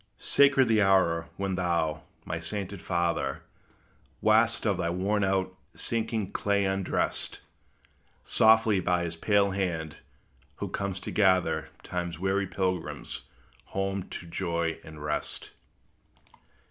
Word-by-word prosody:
Sacred 140 -2 +4
the 110 -1 +3
hour 85 -4 +3
when 95 -1 -1
thou, 85 -4 0 0.2
my 80 +1 -3
sainted 95 +3 -4
father, 85 -2 -1 0.8
Wast - - +4
of - - +2
thy 85 - -1
worn 100 +4 0
out, 95 -1 0 0.2
sinking 110 -3 -1
clay 100 -1 +1
undressed, 95 -1 -1 0.8
Softly, 110 -2 +5
by 90 -1 +1
his 85 -1 -3
pale 100 +3 +2
hand, 85 -5 -2 0.6
who - - -5
comes 100 -1 -3
to - - -5
gather 95 -3 +2
Time's 85 -2 -4
weary 95 +2 0
pilgrims 90 -2 -3 0.5
home 95 -1 -2
to - - -7
joy 85 -1 -2
and 80 -1 -10
rest. 75 0 -3
95 Hz, 120 wpm, -28 LUFS, 85-100 Hz, 0.8 s, Softly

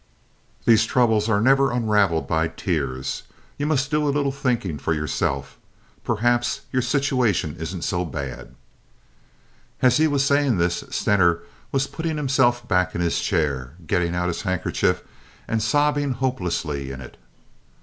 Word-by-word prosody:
These 110 -1 +5
troubles 110 -3 +2
are 100 -2 +3
never 135 +4 +4
unraveled 105 -8 +2
by 80 0 +1
tears. 70 -6 -3 0.4
You 145 - 0
must 145 -2 0
do 150 0 +1
a - - +2
little 140 -1 +1
thinking 120 - -1
for 80 +3 0
yourself. 75 -3 -2 0.4
Perhaps 120 +3 +1
your 130 - +1
situation 125 - +1
isn't 80 +1 -5
so 90 -1 0
bad." 70 -6 -6 1.3
As 125 -1 +5
he 160 +1 +4
was 140 -2 +1
saying 140 -5 +2
this 85 0 0
Stener 90 -4 +2 0.3
was 135 -1 +1
putting 160 0 -4
himself 130 -4 +2
back 90 -2 +1
in 85 - -1
his 85 -1 +1
chair, 70 -7 -1
getting 90 +1 0
out 90 0 0
his 85 - -2
handkerchief, 95 -2 0 0.4
and 110 -1 0
sobbing 145 +4 +2
hopelessly 90 - -2
in 65 - -7
it. - - -11
110 Hz, 145 wpm, -23 LUFS, 85-135 Hz, 1.3 s, These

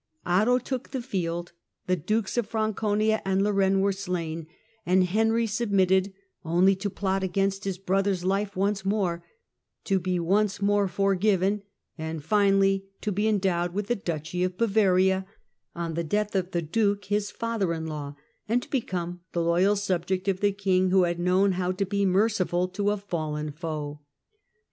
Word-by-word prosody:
Otto 210 +8 +3
took 255 0 -4
the 265 -2 -3
field, 175 -6 -3 0.3
the 185 - +2
dukes 200 +5 -1
of 240 -4 0
Franconia 215 0 0
and 195 0 +1
Lorraine 195 -1 +2
were 200 +1 +2
slain, 170 -5 -4 0.4
and 185 +1 +3
Henry 225 +5 +2
sub 225 +1 -2
mitted, 190 0 +3 0.3
only 180 +4 +3
to 200 +1 -2
plot 195 0 -1
against 195 +1 -1
his 195 -2 -2
brother's 195 0 0
life 200 +1 0
once 195 +1 0
more, 190 -4 0 0.6
to 195 -2 +1
be 180 0 -1
once 195 +4 +1
more 205 0 +2
forgiven, 195 +1 +1 0.4
and 160 -1 -4
finally 195 0 +3
to 210 - -1
be 205 +3 0
endowed 185 -4 0
with 205 0 -2
the 240 - +2
duchy 170 -2 -3
of 180 0 -2
Bavaria 190 -4 +3 0.5
on 170 -1 -3
the 170 +1 -1
death 205 +5 -1
of 185 -1 0
the 175 -3 -2
duke 200 +4 0
his 205 +1 0
father 230 -6 -2
in 160 -1 -3
law, 145 -2 -5 0.3
and 245 +2 +2
to - - -14
become 180 -8 -2
the 170 - 0
loyal 180 +5 +3
subject 190 -1 -1
of 190 -1 +1
the 205 0 +2
king 190 -2 +1
who 190 0 +4
had 175 0 -1
known 185 +3 +3
how 180 0 -1
to 195 +2 -1
be 200 0 0
merciful 185 -2 +1
to 200 +2 -1
a 210 - +1
fallen 155 -6 -3
foe. 150 -2 -5
195 Hz, 170 wpm, -26 LUFS, 175-205 Hz, 0.6 s, who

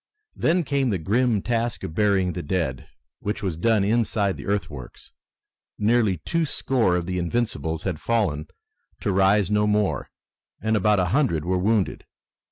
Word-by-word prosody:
Then 170 +2 +2
came 140 -3 0
the 100 - 0
grim 110 +4 +1
task 120 -1 -1
of 80 - -5
burying 95 -2 +2
the - - -4
dead, 75 -5 -2 0.3
which 105 +1 -3
was 95 -5 -1
done 110 +4 +2
inside 105 -2 +1
the - - -9
earthworks. 100 -11 -4 0.7
Nearly 110 -3 +2
two 165 0 0
score 125 - +1
of 90 -1 -1
the 90 0 -2
Invincibles 85 -5 -2
had 90 -5 -3
fallen 95 -10 0 0.5
to 100 - 0
rise 95 +1 +3
no 105 0 +2
more, 105 -9 0 0.5
and 110 +2 0
about 105 0 +3
a 90 - +2
hundred 115 - +1
were 90 +1 +1
wounded. 105 +1 0
105 Hz, 160 wpm, -24 LUFS, 90-115 Hz, 0.7 s, rise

